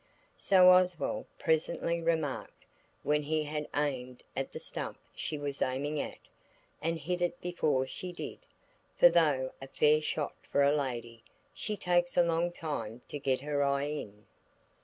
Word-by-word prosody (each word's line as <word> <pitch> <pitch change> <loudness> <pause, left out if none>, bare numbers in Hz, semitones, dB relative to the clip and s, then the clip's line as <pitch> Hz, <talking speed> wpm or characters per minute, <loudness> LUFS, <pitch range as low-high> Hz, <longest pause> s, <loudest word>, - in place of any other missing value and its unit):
So 185 -2 +7
Oswald 180 -2 +2
presently 170 +1 0
remarked, 160 -4 -2 0.4
when 150 0 +2
he 155 +1 0
had 150 0 -3
aimed 130 -4 -2
at - - -2
the - - -6
stump - - -5 0.2
she 155 - -3
was 145 -1 -4
aiming 145 +4 0
at, - - -4 0.6
and 165 +1 0
hit 175 +4 -3
it 175 0 0
before 155 -7 +1
she 180 +7 -6
did, 175 - -7 0.6
for 260 - +8
though 145 - +3
a 135 - -7
fair 150 +3 +4
shot 150 0 -2 0.2
for 140 - +4
a 140 +1 +4
lady, 120 -5 -3 0.3
she 210 -1 -3
takes 175 -1 +1
a 175 - +7
long 170 +1 +1
time 145 -9 -5
to 145 - -4
get 135 -2 0
her 145 0 -1
eye 140 0 +1
in. 105 -9 -6
150 Hz, 160 wpm, -31 LUFS, 140-170 Hz, 0.6 s, for